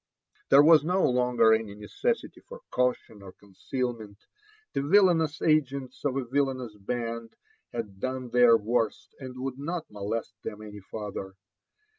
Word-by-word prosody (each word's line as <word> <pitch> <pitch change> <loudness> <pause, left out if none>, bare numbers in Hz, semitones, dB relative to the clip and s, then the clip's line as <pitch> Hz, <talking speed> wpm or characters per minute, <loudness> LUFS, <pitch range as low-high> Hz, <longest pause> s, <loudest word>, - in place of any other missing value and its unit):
There 140 +1 +8
was 155 -1 +7
no 180 +4 +2
longer 125 -3 +3
any 110 -2 -1
necessity 455 - -3
for - - -10
cautioti 125 -4 -1
or 95 -1 -11
concealment; 110 +1 -5 0.6
the - - 0
villanous 165 -1 +3
agents 140 -4 0
of 140 -2 0
a 135 - -2
vil 140 +3 +1
lanous 130 -4 -6
band 115 +2 -5 0.4
had 105 -5 -6
doAe 130 +1 -4
their 120 -1 +6
worst 115 0 -2
and 130 -2 -8
would 130 0 -4
not 165 +1 -4
molest 105 +2 -4
them 105 0 -6
any 105 -1 -9
farther. 100 -1 -7
125 Hz, 145 wpm, -27 LUFS, 110-140 Hz, 0.6 s, There